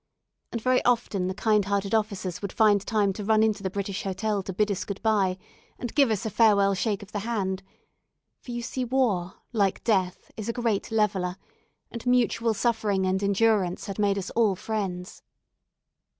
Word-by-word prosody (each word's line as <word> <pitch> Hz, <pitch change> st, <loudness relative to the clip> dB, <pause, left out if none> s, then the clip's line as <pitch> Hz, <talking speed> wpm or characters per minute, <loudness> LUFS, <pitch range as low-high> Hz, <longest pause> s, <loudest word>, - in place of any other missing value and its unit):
And 235 Hz, -, -2 dB
very 255 Hz, +2 st, +2 dB
often 230 Hz, -6 st, +1 dB
the 185 Hz, -, -3 dB
kind 210 Hz, -1 st, +2 dB
hearted 200 Hz, 0 st, -1 dB
officers 195 Hz, -5 st, -1 dB
would 200 Hz, -2 st, -4 dB
find 210 Hz, -2 st, +4 dB
time 205 Hz, -3 st, +1 dB
to 205 Hz, -, -6 dB
run 220 Hz, +1 st, +3 dB
into 215 Hz, -2 st, +1 dB
the 190 Hz, -, -2 dB
British 195 Hz, 0 st, -3 dB
Hotel 200 Hz, +2 st, -1 dB
to 190 Hz, -, -6 dB
bid 210 Hz, +3 st, +1 dB
us 195 Hz, -, -2 dB
good 200 Hz, -1 st, -5 dB
bye, 200 Hz, -4 st, +2 dB, 0.4 s
and 245 Hz, -2 st, -5 dB
give 275 Hz, -4 st, +4 dB
us 215 Hz, -2 st, -1 dB
a 220 Hz, -, -2 dB
farewell 200 Hz, -3 st, +4 dB
shake 200 Hz, +1 st, -1 dB
of 195 Hz, -, -14 dB
the 205 Hz, -, -2 dB
hand; 195 Hz, -4 st, -2 dB, 0.8 s
for -, -, -15 dB
you 240 Hz, 0 st, -4 dB
see 255 Hz, +2 st, -3 dB
war, 230 Hz, -8 st, 0 dB, 0.2 s
like 200 Hz, -4 st, +1 dB
death, 190 Hz, -5 st, 0 dB
is 215 Hz, 0 st, -5 dB
a -, -, 0 dB
great 230 Hz, -5 st, -1 dB
leveller, 190 Hz, -4 st, 0 dB, 0.5 s
and 235 Hz, +1 st, -7 dB
mutual 235 Hz, -2 st, +2 dB
suffering 215 Hz, -5 st, +1 dB
and 190 Hz, +1 st, 0 dB
endurance 200 Hz, -2 st, +2 dB
had 195 Hz, 0 st, -6 dB
made 200 Hz, -1 st, +2 dB
us 195 Hz, -1 st, -4 dB
all 220 Hz, -4 st, +2 dB
friends. 190 Hz, -3 st, -4 dB
205 Hz, 185 wpm, -26 LUFS, 190-225 Hz, 0.8 s, find